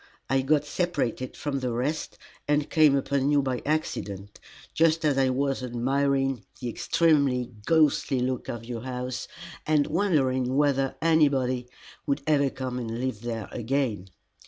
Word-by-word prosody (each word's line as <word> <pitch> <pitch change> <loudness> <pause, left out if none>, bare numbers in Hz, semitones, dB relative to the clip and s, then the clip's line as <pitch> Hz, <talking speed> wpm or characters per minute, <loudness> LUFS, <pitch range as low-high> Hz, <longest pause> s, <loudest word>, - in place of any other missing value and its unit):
I 135 0 +3
got 145 +2 +2
separated 145 -8 -2
from 140 -2 -2
the 125 -2 -2
rest, 135 +7 -2 0.3
and 145 0 +1
came 155 -3 +5
upon 140 0 0
you 145 -1 +3
by 130 -2 -2
accident, 105 -10 -3 0.3
just 165 0 +3
as 145 -2 +3
I 135 -1 +3
was 135 +1 0
admiring 135 +2 0 0.2
the 125 - -3
extremely 135 -3 +2 0.2
ghostly 150 -4 +3
look 125 0 -2
of 115 -1 -5
your 120 -1 -5
house, 125 0 -4 0.4
and 150 -2 +3
wondering 135 -8 +1
whether 135 -2 +2
anybody 135 -6 +2 0.4
would 140 0 0
ever 140 -3 +3
come 130 -1 -4
and 115 -1 -4
live 125 -5 -3
there 115 -3 -4
again. 120 -5 -2
135 Hz, 145 wpm, -26 LUFS, 125-145 Hz, 0.4 s, came